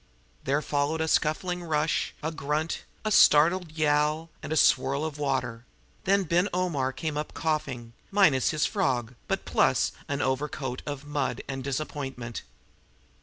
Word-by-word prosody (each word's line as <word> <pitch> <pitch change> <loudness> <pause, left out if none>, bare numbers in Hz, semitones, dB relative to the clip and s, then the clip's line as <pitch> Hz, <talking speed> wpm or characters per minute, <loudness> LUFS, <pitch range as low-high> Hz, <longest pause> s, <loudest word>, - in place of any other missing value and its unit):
There 140 +3 +1
followed 145 +2 0
a 160 - 0
scuffling 175 +4 +1
rush, 155 -1 0
a 160 - -1
grunt, 155 +1 -2 0.2
a 215 - 0
startled 170 -2 +5
yowl, 155 +1 +1
and - - -7
a 160 - +1
swirl 140 +1 +3
of 150 -2 -5
water; 125 -5 -1 0.4
then 195 0 +3 0.3
Omar 175 -8 0
Ben - - -23
came 155 -3 -2
up 150 - -4
coughing, 140 -7 -2 0.2
minus 185 -10 +4
his 155 -2 +1
frog, 130 - 0
but - - -2
plus - - +2 0.2
an 140 0 -2
overcoat 130 -1 -2
of 145 -1 -5
mud 145 -2 -2
and 135 -1 -4
disappointment. 135 -4 -4
150 Hz, 145 wpm, -27 LUFS, 135-160 Hz, 0.4 s, startled